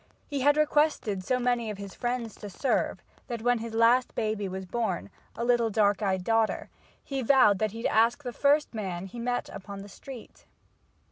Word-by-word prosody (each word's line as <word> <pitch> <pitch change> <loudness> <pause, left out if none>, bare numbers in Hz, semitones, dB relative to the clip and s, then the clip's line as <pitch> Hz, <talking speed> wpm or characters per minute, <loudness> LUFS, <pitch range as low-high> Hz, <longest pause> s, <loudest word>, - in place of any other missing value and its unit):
He 285 -3 -3
had 290 +2 +4
requested 295 -10 +2
so 255 +7 +1
many 245 -2 0
of 210 - -5
his 200 -1 -8
friends 240 -3 -3
to 205 - -8
serve, 255 +8 -1 0.2
that 235 -3 -5
when 245 -1 +3
his 225 0 -6
last 235 +3 +4
baby 215 -3 -1
was 190 +1 -5
born, 185 - -2 0.2
a 235 - -2
little 240 -2 +3
dark 205 -1 +2
eyed 190 -3 0
daughter, 225 +1 +1 0.3
he 270 -1 -3
vowed 240 -6 +5
that 215 - +1
he'd 225 +3 -7
ask 230 +6 +3
the 245 -2 -5
first 290 +2 +2
man 190 -5 -4
he 215 +5 -9
met 245 +1 -1
upon 200 0 -8
the - - -10
street. 250 +3 -12
230 Hz, 190 wpm, -28 LUFS, 205-245 Hz, 0.3 s, vowed